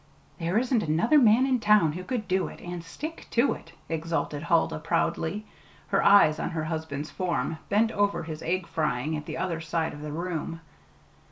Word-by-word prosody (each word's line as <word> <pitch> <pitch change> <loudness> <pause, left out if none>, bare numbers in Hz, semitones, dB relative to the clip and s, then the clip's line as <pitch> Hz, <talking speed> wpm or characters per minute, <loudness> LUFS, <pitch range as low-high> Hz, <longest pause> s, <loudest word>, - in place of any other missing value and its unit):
"There 170 +4 0
isn't 245 -1 +2
another 170 - +3
man 235 +1 +5
in 260 -2 +2
town 210 -7 +4
who 180 +4 -6
could 235 -2 -3
do 185 +1 +1
it - - -10
and 175 -1 -6
stick 310 - -7
to 240 +4 +3
it!" - - -12
exulted 165 -2 -2
Huldah 165 -1 +1
proudly, 175 +5 -1 0.4
her - - +2
eyes 200 -6 +6
on - - -2
her 165 -3 -3
husband's 155 -2 -4
form, 165 -4 -2
bent 220 +2 +3
over 205 -3 +1
his 160 -1 -6
egg 180 +2 -1
frying 155 -2 -1
at 150 0 -6
the - - -4
other 170 -3 -2
side 160 0 -1
of 145 - -9
the 150 0 -5
room. 165 0 -4
170 Hz, 185 wpm, -27 LUFS, 160-210 Hz, 0.4 s, eyes